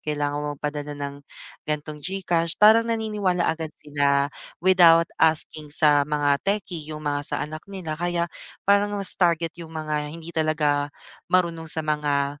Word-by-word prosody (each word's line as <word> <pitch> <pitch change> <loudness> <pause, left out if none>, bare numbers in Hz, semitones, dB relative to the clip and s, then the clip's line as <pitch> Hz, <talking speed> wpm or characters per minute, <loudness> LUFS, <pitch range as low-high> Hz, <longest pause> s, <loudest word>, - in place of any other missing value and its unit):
kailangan 145 -1 -2
mo 150 - -4
magpadala 145 0 -5
ng 140 0 -5 0.5
ganitong 150 0 -4
GCash 175 -2 -1
parang 225 +2 +6
naniniwala 210 -6 0
agad 160 0 -1
sila, 140 -1 0 0.3
without 170 -3 +6 0.2
asking 155 -1 +3
sa 145 -1 +4
mga 145 -1 +1
techie, 195 -4 -2
yung 155 -1 -7
mga 145 0 -1
sa 145 - -2
anak 155 +1 -8
nila, 170 -5 -6
kaya 175 -1 0 0.4
parang 205 +1 +2
mas 195 -2 +4
target 170 -2 +1
yung 165 - -9
mga 150 -1 -3
hindi 165 +2 -9
talaga, 150 -2 0 0.4
marunong 170 -3 0
sa 160 -1 0
mga 145 -1 -1
155 Hz, 150 wpm, -24 LUFS, 150-175 Hz, 0.5 s, parang